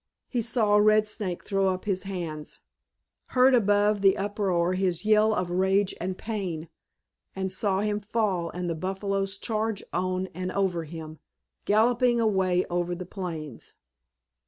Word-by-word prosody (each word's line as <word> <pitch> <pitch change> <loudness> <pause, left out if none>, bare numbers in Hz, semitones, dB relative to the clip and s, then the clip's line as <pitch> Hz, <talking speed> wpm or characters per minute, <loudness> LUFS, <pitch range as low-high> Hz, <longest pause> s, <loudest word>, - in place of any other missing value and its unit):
He 245 - -1
saw 220 -2 +2
Red 215 +1 +5
Snake 205 -4 -3
throw 195 -1 +1
up 185 -1 -1
his 195 -2 -1
hands, 165 -5 -6 0.8
heard 255 +1 +6
above 205 -2 +3
the 195 -1 +5
uproar 195 -3 0
his 185 -1 -1
yell 215 0 +4
of 180 -4 -1
rage 190 +2 +2
and 185 +1 -3
pain, 180 -8 -4 0.7
and 190 -1 -2
saw 195 0 0
him 210 0 0
fall 200 -5 -1
and 175 +2 -4
the 170 - 0
buffaloes 195 +3 -2
charge 220 -1 -2
on 185 +1 -1
and 185 +2 -4
over 180 -4 0
him, 155 -1 -9 0.5
galloping 240 +3 +3
away 190 -5 +2
over 175 0 -2
the 180 +1 -7
plains. 165 - -7
195 Hz, 145 wpm, -27 LUFS, 180-210 Hz, 0.8 s, heard